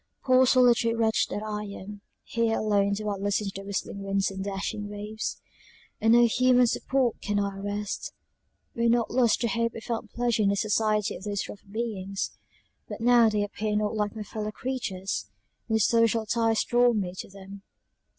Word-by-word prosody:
"Poor 255 0 +5
solitary 240 -2 +4
wretch 220 -1 +2
that 205 - -4
I 210 -1 -4
am; 200 0 -9 0.2
here 230 -1 0
alone 200 -2 +2
do 210 +1 -3
I 205 -1 -1
listen 205 +2 0
to 195 - -4
the 195 - -7
whistling 200 0 -4
winds 195 0 0
and 190 0 -5
dashing 200 +1 -4
waves; 210 +1 -5 0.6
on 225 +1 +5
no 240 0 +7
human 250 +1 +4
support 250 0 0
can 205 0 -1
I 200 -1 -2
rest 205 +1 -4 0.6
when 235 0 +1
not 235 -1 +2
lost 240 -2 +3
to 235 - +2
hope 230 +2 0
I - - -5
found 225 0 -4
pleasure 240 -2 0
in 200 - +3
the 200 - +2
society 215 0 +1
of - - -9
those 205 -2 -2
rough 205 - -10
beings; 200 -3 -3 0.6
but - - -6
now 235 -1 +5
they 210 -1 0
appear 210 +1 -3
not 210 0 0
like 210 -1 -1
my 215 - -5
fellow 210 +1 -5
creatures; 195 - -3 0.4
no 220 - +3
social 230 +1 +3
ties 225 0 +1
draw 240 0 +3
me 190 -5 -2
to - - -6
them. 195 0 -11
215 Hz, 185 wpm, -27 LUFS, 200-230 Hz, 0.6 s, no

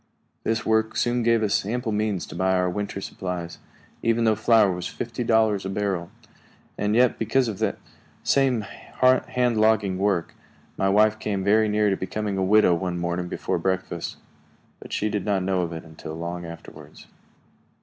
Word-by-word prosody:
This 110 0 -1
work 110 0 +1
soon 120 0 +1
gave 115 -1 +3
us 105 - +1
ample 115 +3 -2
means 105 -3 -1
to - - -11
buy 95 +1 +1
our 90 -1 +1
winter 100 0 -4
supplies, 90 -3 -5 0.4
even 115 0 +1
though 110 -1 +4
flour 110 -1 +4
was 90 -1 -4
fifty 120 +1 -4
dollars 110 -3 +2
a 95 - -4
barrel. 95 -3 -2 0.7
And 105 +1 0
yet, 125 0 +3
because 115 +3 +1
of 105 -4 -4
that - - 0 0.5
same 135 -4 +2
hand 125 +1 +1
logging 105 -4 +2
work, 95 -4 0 0.4
my 95 - +1
wife 105 +2 +4
came 100 -3 -2
very 110 +2 +3
near 105 -1 +2
becoming 100 +2 -3
a 95 - 0
widow 105 -1 +5
one 90 0 -2
morning 85 +1 -2
before - - -2
breakfast; 95 -3 -2 0.6
but - - -12
she 105 - 0
did 105 -2 -2
not 100 -2 0
know 95 -1 +1
of 85 -1 -3
it 80 0 -6
until 80 -1 -9
long 85 +1 -5
afterwards. 85 -1 -12
105 Hz, 170 wpm, -24 LUFS, 95-110 Hz, 0.7 s, widow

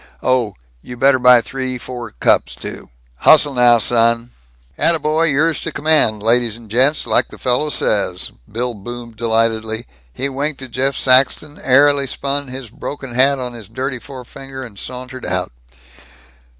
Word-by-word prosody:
Oh, 125 -6 +1 0.3
you 125 - -10
better 135 +1 +3
buy 125 -1 +6
three 130 +2 -5
four 120 -2 -7
cups, - - +1
too. - - -9 0.3
Hustle 150 - +5
now, 120 -1 +5
son!" 115 +1 +1 0.4
"Attaboy! 160 - +1
Yours 155 +3 +1
to - - -4
command, 140 -9 +2
ladies 115 -1 +2
and 115 -3 -16
gents, 135 +6 +3
like - - +2
the - - -13
fellow 125 +4 0
says!" 100 -9 0 0.2
Bill 120 +2 -2
boomed 115 +2 -9
delightedly. 110 0 0 0.3
He 135 - -2
winked 140 +1 -3
at 130 - -7
Jeff 135 +3 0
Saxton, 135 +3 +2
airily 140 +1 +4
spun 140 +1 -2
his 130 -3 -8
broken 135 0 -7
hat 135 +3 +3
on 125 -2 -5
his 115 -4 -11
dirty 130 +2 -4
forefinger, 135 +1 -9
and 105 -6 -11
sauntered 130 0 -8
out. - - -2
125 Hz, 150 wpm, -17 LUFS, 115-135 Hz, 0.4 s, buy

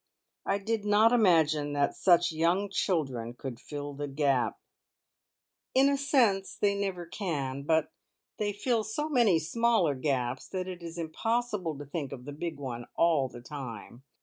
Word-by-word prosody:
I 195 - +2
did 215 +1 -2
not 210 +2 +5
imagine 160 -10 +3
that 145 0 +1
such 175 -2 +4
young 175 +5 +1
children 135 - -1
could 125 -2 -7
fill 145 +1 -6
the 145 +1 -4
gap 140 -3 +1 0.6
" - - -56
"In 270 +2 +6
a 280 - +2
sense 240 -9 +2
they 205 -1 +2
never 195 -3 -3
can, 145 -8 -3
but 160 +2 +1 0.5
they 210 -1 0
fill 225 +2 0
so 295 +9 -3
many 235 - +4
smaller 205 -1 +2
gaps 130 -2 -2
that 185 -1 -4
it 180 -1 -7
is 165 0 -8
impossible 185 0 -1
to 145 - -7
think 140 -1 -4
of 125 -2 -8
the 145 - -6
big 160 +1 -4
one 120 -4 -6
all 160 -6 +3
the 120 -1 -11
time. 125 -3 -8
165 Hz, 165 wpm, -29 LUFS, 140-205 Hz, 0.6 s, In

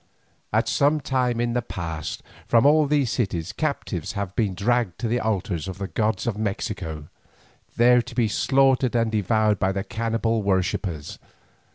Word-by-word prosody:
At - - +1
some 145 +2 +2
time 125 -4 0
in 120 0 0
the 125 - +1
past, 80 -8 -5 0.2
from 115 +2 +4
all 150 +1 +5
these 140 -5 +1
cities 95 -8 -2
captives 140 - -3
have 100 -2 -4
been 105 -6 0
dragged 115 -2 0
to 120 - 0
the 120 +2 +1
altars 95 -6 -2
of 95 - -6
the 100 0 -4
gods 110 +2 -1
of 110 -3 -2
Mexico, 80 -7 -3 0.7
there 125 +1 +6
to 120 0 -10
be 120 -3 +2
slaughtered 135 +2 +2
and 115 -1 +2
devoured 110 0 +1
by 95 - +1
the 95 0 -2
cannibal 115 0 -1
worshippers. 95 -5 -1
110 Hz, 165 wpm, -24 LUFS, 95-125 Hz, 0.7 s, there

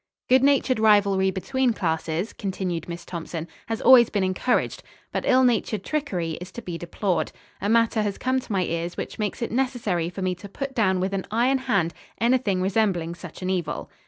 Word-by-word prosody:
"Good 260 +1 +5
natured 275 -3 +3
rivalry 200 -3 +4
between 245 +7 0
classes," 165 0 -2
continued 185 -4 -3
Miss 170 0 -6
Thompson, 165 -1 -5 0.2
"has 225 -1 -3
always 250 -2 +8
been 200 -2 0
encouraged, 185 +7 0 0.3
but - - -2
ill 260 0 +5
natured 220 -4 +1
trickery 185 - -2
is 180 - -8
to 235 - -6
be 175 -4 -5
deplored. 175 0 -1 0.3
A 200 - 0
matter 230 0 +3
has 205 -2 -2
come 260 +1 +1
to 250 - -10
my 190 -2 +2
ears 170 0 -3
which - - -5
makes 210 +2 -2
it - - -3
necessary 225 -9 0
for 190 +2 -6
me 185 0 +1
to 185 +3 -10
put 270 +6 -5
down 190 -7 +2
with 190 +1 -1
an 195 -1 -2
iron 245 +5 +2
hand 195 -10 0 0.3
anything 230 -6 +2
resembling 190 -4 +1
such 180 0 -10
an 185 - 0
evil. 170 -5 -3
200 Hz, 190 wpm, -25 LUFS, 180-235 Hz, 0.3 s, always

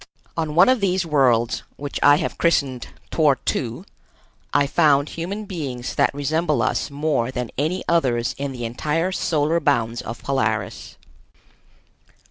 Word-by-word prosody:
On 160 -2 -2
one 180 +3 +7
of 255 -1 +4
these 185 -2 +1
worlds, 120 -6 +2
which 145 0 -5
I 145 - +7
have - - -3
christened 140 -7 +1 0.2
Tor - - +3
tu, - - -3 0.7
I 145 - +3
found 145 -1 +3
human 195 +6 -5
beings 135 -10 -5
that - - +3
resemble 150 +2 0
us - - -1
more 140 -4 -1
than 125 -2 -4
any 160 +7 -1
others 125 -8 +1
in 140 -1 -3
the 120 -2 -5
entire 150 +9 -1
solar 160 -2 +1
bounds 120 -6 0
of 115 +1 -8
Polaris. 110 -6 -2
145 Hz, 140 wpm, -22 LUFS, 125-165 Hz, 0.7 s, one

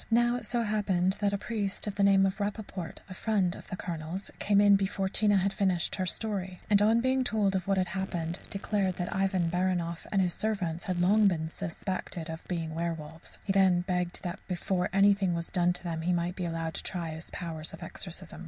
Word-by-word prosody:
Now 240 +1 +3
it 230 -3 -7
so 240 0 +1
happened 195 -4 +1
that 205 -1 +2
a 200 - 0
priest 205 -2 -3
of 205 - -2
the 200 - -2
name 195 -1 +6
of 190 +2 -1
Rappaport, 200 -4 -4
a 185 - -8
friend 190 -3 +1
of - - -11
the - - -4
Colonel's, 175 0 -5
came 200 -1 +3
in 205 -1 +7
before 195 0 0
Tina 205 +1 +3
had 195 +1 +1
finished 185 -4 +1
her 185 -1 -1
story, 190 -3 -3
and 200 -1 +6
on 225 +3 +4
being 260 +1 +2
told 210 -5 +1
what 195 -1 +2
had 185 -1 +1
happened, 175 -2 -3
declared 195 -2 0
that 180 +2 -3
Ivan 190 -3 +1
Baranoff 175 -2 -1
and 195 - +2
his 180 -2 +2
servants 185 -6 -2
had 185 -2 -1
long 205 +4 +5
been 160 -4 0
suspected 170 -1 -4
of 160 - -8
being 165 -3 -3
werwolves. 160 -1 -5
He 195 - +1
then 190 -2 +5
begged 180 0 -2
that 180 +1 -4
before 180 0 -1
anything 195 -2 +4
was 170 0 -3
done 175 -1 +3
to 180 - -8
them 165 -2 -3
he 180 +2 +1
might 175 +1 -1
be 180 - -3
allowed 165 -1 -2
to - - -2
try 170 -3 -2
his 160 +1 -8
powers 160 -3 -5
of - - -9
exorcism. - - -5
185 Hz, 215 wpm, -30 LUFS, 175-200 Hz, -, in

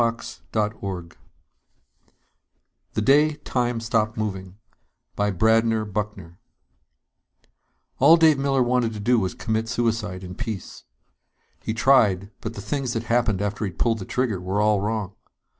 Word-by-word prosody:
net 115 0 -2
THE 100 -5 -3 1.9
DAY 150 +4 +4
TIME 125 -5 -1
STOPPED 115 -1 0
MOVING 95 -3 -4 0.6
By 105 0 +1
BRADNER 110 +3 +2
BUCKNER 105 -4 -5 1.6
_All 155 +6 +7
Dave 160 -4 +5
Miller 135 -2 +2
wanted 120 -2 +1
to 105 - -6
do 120 +3 +3
was 95 -3 -2
commit 110 -1 -2
suicide 115 -5 -1
in 90 0 -7
peace. 110 -3 -6 0.8
He 110 - -3
tried, 105 -6 +3
but 115 0 -5
the 100 - -6
things 130 +3 -2
that 115 - -2
happened 115 -4 +1
after 105 +1 -2
he'd 95 -5 -4
pulled 115 -2 +1
the 95 - -6
trigger 115 -6 -1
were 95 +3 -2
all 105 -1 +3
wrong. 105 -2 -2
110 Hz, 135 wpm, -24 LUFS, 100-120 Hz, 1.9 s, All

